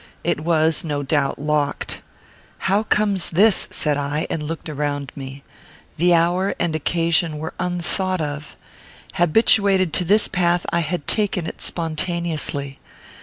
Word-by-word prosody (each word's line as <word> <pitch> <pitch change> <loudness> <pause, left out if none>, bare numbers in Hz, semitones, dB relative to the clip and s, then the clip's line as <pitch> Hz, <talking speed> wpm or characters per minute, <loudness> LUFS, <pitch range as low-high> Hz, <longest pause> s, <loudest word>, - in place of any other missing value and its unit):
It - - 0
was, 160 0 +2
no 145 -3 -2
doubt, 140 -1 0
locked. 150 0 -1 0.6
"How 195 +3 +1
comes 205 -3 +1
this?" 200 +4 +4
said 150 -2 0
I, 145 +2 -2
and 160 - -2
looked 160 +2 -5
around 145 -2 -3
me. 135 0 -8 0.5
The 175 +2 +4
hour 175 +4 +1
and 170 -2 -1
occasion 165 0 +1
were 160 +2 -5
unthought 180 +1 -1
of. 150 -1 -5 0.6
Habituated 190 0 +3
to - - +1
this 205 +4 +3
path, 175 -1 +1
I 170 - +3
had 165 -1 -2
taken 200 -5 +1
it - - -7
spontaneously. 160 -4 -2
165 Hz, 135 wpm, -21 LUFS, 150-180 Hz, 0.6 s, this